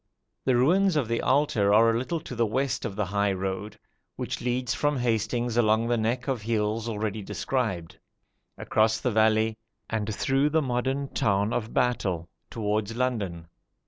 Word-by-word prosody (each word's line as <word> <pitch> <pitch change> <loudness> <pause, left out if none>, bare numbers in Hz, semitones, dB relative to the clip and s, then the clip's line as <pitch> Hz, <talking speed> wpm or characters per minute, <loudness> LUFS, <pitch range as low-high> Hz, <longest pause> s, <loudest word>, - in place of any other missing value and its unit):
The 130 - +3
ruins 180 +9 +3
of 140 -6 +1
the 115 +1 0
altar 130 -7 +2
are 115 +2 +6
a - - 0
little 165 +7 -2
to - - -8
the 120 - +2
west 130 +3 -1
of 105 -4 -4
the 105 0 0
high 100 +1 +1
road, 95 +3 -4 0.4
which - - -4
leads 125 0 -1
from 145 -1 0
Hastings 120 0 0
along 110 -1 +3
the 120 - +3
neck 120 +3 -1
of 130 -5 -1
hills 110 +1 -1
already 110 -1 -3
described, 100 -5 -3 0.6
across 110 +1 +2
the 125 - 0
valley, 110 0 +2 0.3
and 110 -1 -1
through 135 +6 +1
the 160 +2 +2
modern 135 +2 -1
town 100 +1 +1
of 115 -1 -2
Battle, 95 -9 0 0.2
towards 110 0 -2
London. 105 -10 -2
115 Hz, 165 wpm, -27 LUFS, 105-125 Hz, 0.6 s, are